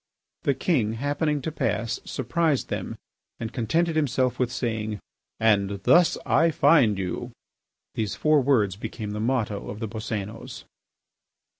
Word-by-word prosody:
The 140 - +1
king, 125 - +1
happening 145 +3 -1
to 160 - -2
pass, 115 -6 -1
surprised 145 +3 0
them - - -4 0.4
and 115 0 -5
contented 160 +8 0
himself 130 -4 +1
with 125 -2 +1
saying, 110 -4 -2 0.4
"And 100 -3 +2
thus 175 -1 +5
I 165 +2 +4
find 135 -10 +4
you." 95 -2 -3 0.6
These 110 -3 -2
four 155 -1 +3
words 115 -8 +2
became 110 0 -6
the 105 - -4
motto 110 -3 -1
of 105 - -6
the 110 - -3
Boscénos. 110 0 -6
115 Hz, 135 wpm, -25 LUFS, 105-145 Hz, 0.6 s, thus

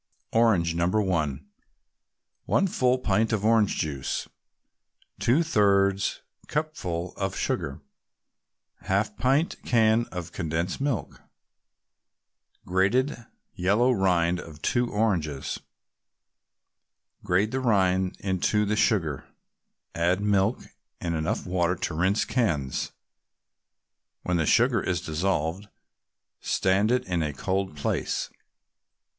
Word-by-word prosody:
ORANGE, 100 -8 +3
No. 85 +1 +1
1 85 -9 0 1.0
1 195 - +2
full 130 -7 +2
pint 110 -2 +1
of 105 -2 0
orange 110 -2 +3
juice 70 -4 -3 0.9
2/3 100 - +2 0.3
cupful 95 - -3
of - - -2
sugar 70 +2 -2 1.0
1/2 100 +2 0
pint 135 +7 +2
can 115 0 +3
of 90 -3 -7
condensed 85 +6 -2
milk 135 -7 -2 1.4
Grated 105 +10 +2 0.4
yellow 105 +8 +2
rind 90 -5 +2
of 80 -3 -11
two 120 0 +1
oranges 85 -10 -1 1.6
Grate 100 +5 +1
the 130 - -1
rinds 95 -6 +2
into 100 +2 +1
the 105 +1 0
sugar, 80 - +1 0.7
add 85 +2 +1
milk 105 +2 +1 0.4
and 85 -1 -2
enough 85 +7 -2
water 90 -1 +1
to 90 - -3
rinse 95 +6 +1
cans. 75 - -1 1.3
When 90 -2 +1
sugar 120 -2 +4
is 90 -2 -1
dissolved, 85 +3 -2 0.7
stand 95 +3 +1
it 125 +1 +1
in 90 -2 -1
a 75 -2 -2
cold 95 0 -2
place. 70 - -2
95 Hz, 100 wpm, -26 LUFS, 85-110 Hz, 1.6 s, sugar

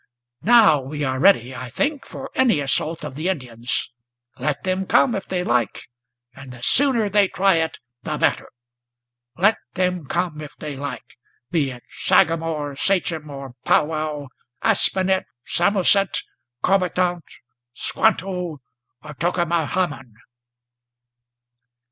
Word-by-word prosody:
Now 215 - +6
we 145 +3 -5
are 130 -1 -1
ready, 130 -8 +4
I 130 0 -6
think, 285 - -1
for 270 - -8
any 245 - +3
assault 155 +4 0
of - - -6
the 155 +7 -2
Indians; 125 -8 -2 0.5
Let 140 +2 -2
them 185 0 -1
come, 245 - +4
if 195 -2 -4
they 180 -1 -1
like, 120 -9 0 0.5
and 130 -1 -11
the 120 -1 -12
sooner 255 - +4
they 200 0 +3
try 190 -2 +2
it 160 0 -1 0.2
the - - -3
better, - - 0 0.9
Let 200 +6 +4 0.2
them 180 -4 -1
come 170 -2 -2
if 150 - -9
they 150 -2 -6
like, 140 -2 -7 0.3
be 150 -5 +1
it 125 -2 -10
sagamore, 160 -3 +1
sachem, 165 -2 0
or 135 -2 -8
pow - - +4
wow, 155 -2 -4 0.3
Aspinet, 190 -3 +2 0.2
Samoset, 195 +1 +2 0.4
Corbitant, 180 -2 +1 0.5
Squanto, 180 -5 0 0.4
or 150 0 -9
Tokamahamon!" 170 -5 -1
165 Hz, 125 wpm, -22 LUFS, 145-190 Hz, 0.9 s, Now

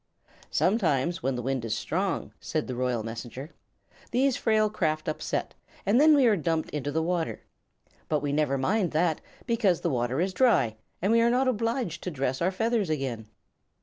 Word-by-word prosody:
"Sometimes, 175 - +1
when 130 +1 0
the 125 - -4
wind 130 -1 -1
is 110 -2 -1
strong," 185 - -2
said 155 -2 -2
the 130 - -5
Royal 125 -2 -1
Messenger, 120 +6 -7 0.6
"these 260 +2 +2
frail 215 -2 +2
craft 155 -7 -1
upset, 155 - -2 0.3
and 225 +7 +4
then 310 0 +7
we 275 -3 +5
are 225 -3 +5
dumped 165 -2 -1
into 145 -1 -3
the 160 +2 0
water. 170 -1 -1 0.7
But 150 -2 +1
we 145 0 -1
never 145 -2 +1
mind 180 +6 0
that, 160 0 +1 0.2
because 220 -8 +2
the 170 - 0
water 125 +2 0
is 185 +2 0
dry 135 - +3 0.3
and 195 - +3
we 230 0 +5
are 235 - +4
not 255 +2 +2
obliged 230 - -1
to - - -3
dress 135 -3 -2
our 175 - +3
feathers 225 0 0
again." 130 -7 -3
165 Hz, 180 wpm, -27 LUFS, 135-215 Hz, 0.7 s, then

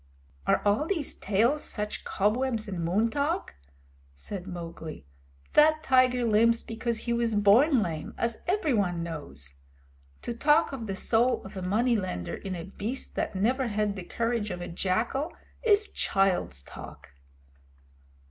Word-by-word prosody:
"Are - - +3
all 210 +10 +2
these 325 -7 -1
tales 230 +9 +1
such 210 -1 -4
cobwebs 220 +2 0
and 185 -4 -3
moon 205 +7 +2
talk?" 295 +7 -1 0.6
said 180 - -6
Mowgli. 165 - -7 0.5
"That 310 +1 +5
tiger 255 -3 +4
limps 230 +1 +4
because 230 0 -3
he 235 - -1
was 235 -2 +1
born 220 +6 +5
lame, 160 -4 -5
as 235 -1 -1
everyone 220 - +1
knows. 75 - -7 0.6
To 235 - -3
talk 295 +7 +3
of 235 -5 -5
the 195 - -3
soul 235 +5 +2
of 195 - -10
a 190 - -4
money 225 +7 +2
lender 185 - -3
in 190 -2 -5
a 170 - -5
beast 210 +7 -4
that - - -2
never 250 +7 +1
had 210 -2 0
the 190 - -5
courage 230 +1 -1
of 180 -2 -4
a 175 - -5
jackal 220 - -1 0.3
is 425 -2 +4
child's 190 - 0
talk." - - -11
220 Hz, 145 wpm, -28 LUFS, 190-255 Hz, 0.6 s, That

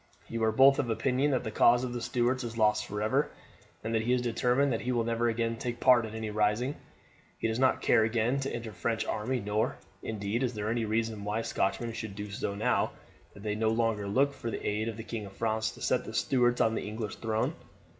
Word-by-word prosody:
You 115 0 -3
are 110 - +3
both 135 +4 +6
of 120 - 0
opinion 130 +5 +1
that 130 -3 +1
the 110 - -4
cause 120 +3 +5
of 125 -1 -3
the 120 - -4
Stuarts 125 +2 0
is 115 -1 -5
lost 105 -1 +2
for 105 +1 -3
ever, 135 +7 +1 0.5
and 115 +1 -1
he 115 +3 +1
is 125 - +2
determined 125 +3 +2
that 115 - -2
he 125 - -1
will 120 -2 +1
never 115 +1 +1
again 115 0 -1
take 120 +1 -4
part 125 -3 +5
in 110 - -8
any 110 -1 -4
rising. 105 +6 +1 0.6
He - - -1
does 110 +1 -1
not 130 0 +2
care 110 - +5
again 115 +4 +1
to 135 0 -2
enter 115 -2 -5
the - - -16
French 115 -1 -1
army, 125 +4 -1
nor, 105 +1 -1 0.2
indeed, 105 +2 -2
is 125 -3 -1
there 105 +1 -2
any 115 -1 0
reason 110 -1 -1
why 105 +2 -1
Scotchmen 115 +1 -1
should 110 -3 -6
do 105 0 -6
so, 100 0 -3
now 105 - +1 0.4
that 100 - -12
they 105 -1 -1
no 110 +1 +1
longer 110 -2 0
look 135 +8 +2
for 120 - -5
the - - -4
aid 110 +2 0
of 110 - -6
the 115 - -6
King 110 -2 -5
of 95 - -13
France 110 0 0
to - - -10
set 125 -1 +1
the 110 - -8
Stuarts 120 +1 +2
on 110 - +3
the - - -2
English 110 0 -5
throne. 110 -1 -1
115 Hz, 240 wpm, -30 LUFS, 110-120 Hz, 0.6 s, both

